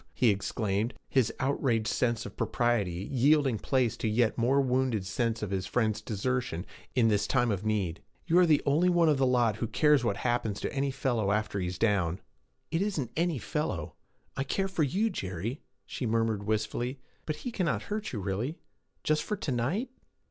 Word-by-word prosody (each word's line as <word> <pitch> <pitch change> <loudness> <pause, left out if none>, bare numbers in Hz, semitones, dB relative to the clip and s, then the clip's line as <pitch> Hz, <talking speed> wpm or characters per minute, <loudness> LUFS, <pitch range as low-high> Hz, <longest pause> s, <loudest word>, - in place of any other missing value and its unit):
he 120 - +4
exclaimed, 105 +2 -1
his 130 -5 +2
outraged 130 -5 +1
sense 120 -1 0
of 100 - -8
propriety 100 -6 0
yielding 135 -2 +3
place 130 -5 +1
to - - -2
a - - +2
yet 110 +1 +2
more 125 +4 +3
wounded 130 -6 +1
sense 115 +2 -1
of 100 - -3
his 95 -1 -2
friends' 110 -3 0
desertion 110 -3 -2 0.3
in 120 -3 +4
this 105 -1 +2
time 120 -3 +2
of 100 -1 -2
need; 100 -6 -1 0.2
'you 175 +1 +4
are 180 - +6
the 150 -2 +4
only 155 +6 +3
one 175 -2 +4
of 150 -3 +3
the 135 - +4
lot 120 -4 +2
who 115 - -2
cares 150 +2 +3
what 110 -4 0
happens 120 -4 -1
to - - -3
any 140 0 0
fellow 125 -6 0
after 105 -1 0
he 90 - -1
is 90 0 -4
down.' 95 -5 +1 0.5
'It 165 +2 +1
isn't 160 - -1
"any 170 -2 +1
fellow." 150 - -3 0.4
I 135 - -1
care 195 +8 -1
for 185 -4 -2
you, 195 +10 +1
Jerry,' 95 - -4 0.2
she 125 - -4
murmured 110 -2 0
wistfully. 120 +5 -1 0.3
'But 155 - -1
he 245 +10 -5
cannot 185 -8 -1
hurt 215 +1 -4
you, 115 - -3
really? 105 - -2 0.5
Just 155 0 +2
for 210 +6 -3
to 150 - -3
night?' 160 - -1
120 Hz, 190 wpm, -29 LUFS, 105-140 Hz, 0.5 s, are